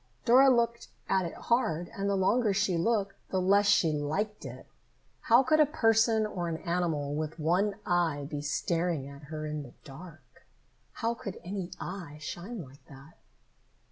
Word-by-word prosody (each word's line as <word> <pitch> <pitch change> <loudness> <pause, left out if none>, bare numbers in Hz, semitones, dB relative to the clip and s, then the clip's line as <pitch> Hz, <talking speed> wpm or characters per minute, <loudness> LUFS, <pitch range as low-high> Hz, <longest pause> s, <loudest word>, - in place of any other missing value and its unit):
Dora 260 +3 +7
looked 235 -2 +1 0.2
at 190 -2 +1
it - - -8
hard, 175 -9 0
and 200 0 -1
the 200 - +1
longer 205 +2 +2
she 200 -3 +1
looked, 200 +2 0 0.2
the 190 - 0
less 200 +2 +3
she 170 -5 +4
liked 160 +9 -2
it. - - -9 0.5
How 240 +3 +5
could 310 +4 +3
a 305 - +7
person 225 -4 +3
or 175 -5 -3
an 160 - -3
animal 165 -5 -1
with 155 +1 -3
one 180 +6 +1
eye 165 -5 +1
be 145 -1 -5
staring 165 0 -1
at 140 +1 -11
her 155 +1 -6
in 150 0 -4
the 125 -4 -12
dark? 155 +3 -14 0.5
How 230 0 -1
could 200 -5 -7
any 185 0 -4
eye 175 -5 -7
shine 175 +7 -6
like 135 +1 -16
that? 140 +3 -15
180 Hz, 170 wpm, -29 LUFS, 155-210 Hz, 0.5 s, Dora